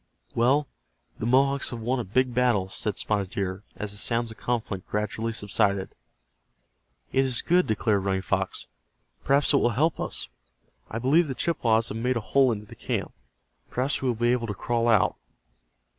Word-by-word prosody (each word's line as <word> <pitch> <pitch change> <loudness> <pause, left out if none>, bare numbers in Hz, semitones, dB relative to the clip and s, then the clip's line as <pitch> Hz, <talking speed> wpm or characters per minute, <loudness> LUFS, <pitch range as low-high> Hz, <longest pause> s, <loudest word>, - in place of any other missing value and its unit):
"Well, 135 +5 +2 0.5
the 110 - -2
Mohawks 135 +2 +3
have 120 - -6
won 125 +3 -1
a - - -1
big 125 +6 0
battle," 120 -6 +2
said 100 +1 -1
Spotted 100 -3 -1
Deer, 95 -1 -3
as 105 -1 -4
the 100 - -5
sounds 115 +1 0
of 110 - -12
conflict 110 -6 -3
gradually 105 +2 -2
subsided. 100 -3 0 1.2
"It 135 - +3
is 130 -3 0
good," 180 +1 +3
declared 105 -2 +1
Running 95 -1 -1
Fox. 80 - -2 0.6
"Perhaps 140 +2 +5
it - - +6
will 120 - +3
help 160 +3 +2
us. - - -3 0.6
I 110 - -4
believe 145 +8 +3
the 135 - -4
Chippewas 115 -9 +1
have 110 - -4
made 125 +1 0
a - - 0
hole 130 +3 +3
into 105 -2 -4
the - - -13
camp. - - -3 0.6
Perhaps 130 +4 -1
we 135 - -1
will 120 - +1
be 120 +2 +2
able 120 -2 0
to 105 - -4
crawl 120 +3 0
out." 110 -5 +3
115 Hz, 180 wpm, -26 LUFS, 105-130 Hz, 1.2 s, it